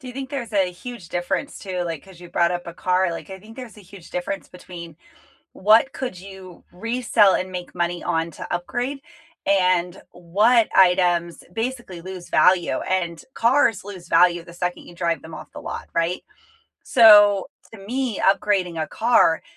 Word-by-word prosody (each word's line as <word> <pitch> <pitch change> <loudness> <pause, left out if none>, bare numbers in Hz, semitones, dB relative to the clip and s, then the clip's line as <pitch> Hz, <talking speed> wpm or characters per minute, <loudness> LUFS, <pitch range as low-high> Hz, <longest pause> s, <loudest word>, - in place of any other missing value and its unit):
Do 260 - -10
you - - -7
think 265 +1 -6
there's 240 -6 -5
a 190 -3 +2
huge 195 -1 -10
difference, 175 +11 -3
too, 185 -3 -4
like, 165 -3 -5
'cause 190 -3 -16
you 175 - -11
brought 170 0 +2
up 175 0 -4
a 170 - -8
car? 185 0 +1
Like, 165 - -8
I 190 - -7
think 220 +4 -15
there's 250 -4 -9
a - - -13
huge 190 -2 -14
difference 190 +2 -4
between 170 -3 -11 0.6
what 220 +7 +4
could 250 -9 -5
you 190 -1 -12
resell 225 0 +2
and 185 0 -2
make 180 -1 -7
money 175 0 -2
on 165 -1 -1
to - - -9
upgrade, 245 +10 -3 0.4
and 185 -2 +1
what 210 +7 +2
items, 180 -2 +3
basically, 225 -5 -4
lose 185 0 -9
value, 180 -2 +3
and 170 -3 -2
cars 235 -4 +2
lose 185 -4 -10
value 175 -1 +4
the 170 - -14
second 180 0 -3
you - - -13
drive 170 -1 -1
them 160 0 -10
off - - -11
the - - -9
lot, - - -7
right? 170 +2 -1 0.6
So, 205 -4 +7 0.3
to 225 - -11
me, 240 +3 -3
upgrading 190 -4 +1
a 155 - -1
car 225 -8 +3
185 Hz, 180 wpm, -22 LUFS, 175-220 Hz, 0.6 s, So